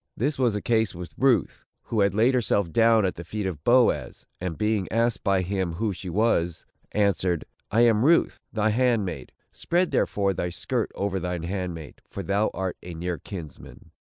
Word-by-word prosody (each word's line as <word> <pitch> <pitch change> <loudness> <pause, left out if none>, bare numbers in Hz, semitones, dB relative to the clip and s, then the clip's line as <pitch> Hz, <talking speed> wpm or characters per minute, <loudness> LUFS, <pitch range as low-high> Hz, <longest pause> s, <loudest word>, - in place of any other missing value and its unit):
This 140 +4 -1
was 120 -5 +2
the 105 - -3
case 110 -4 +1
with 90 0 -8
Ruth, 130 -2 +1 0.2
who 115 - -2
had 100 -1 +2
laid 115 +5 +4
herself 100 -7 +1
down 115 +1 +4
at 90 - 0
the 85 - -8
feet 105 +4 -4
of 80 -6 -4
Boaz; 125 0 +2
and 90 -4 -4
being 105 -3 0
asked 115 +1 +1
by 95 -2 +2
him 95 -2 -2
who 105 +4 -1
she 90 0 -7
was, 85 -4 +1 0.3
answered, 95 -4 +1 0.2
"I 115 +3 +3
am 115 -2 +4
Ruth, 165 +4 +3
thine 110 -1 +1
handmaid; 115 -5 0 0.2
spread, 175 +1 0
therefore, 100 -1 +1
thy 90 -1 -2
skirt 85 - -2
over 95 -1 -1
thine 90 -1 -3
handmaid, 90 -4 -5
for 100 - -6
thou 100 +3 +1
art 95 -1 -3
a 90 -1 -8
near 85 +1 -3
kinsman." 85 -9 -10
100 Hz, 185 wpm, -25 LUFS, 90-115 Hz, 0.3 s, laid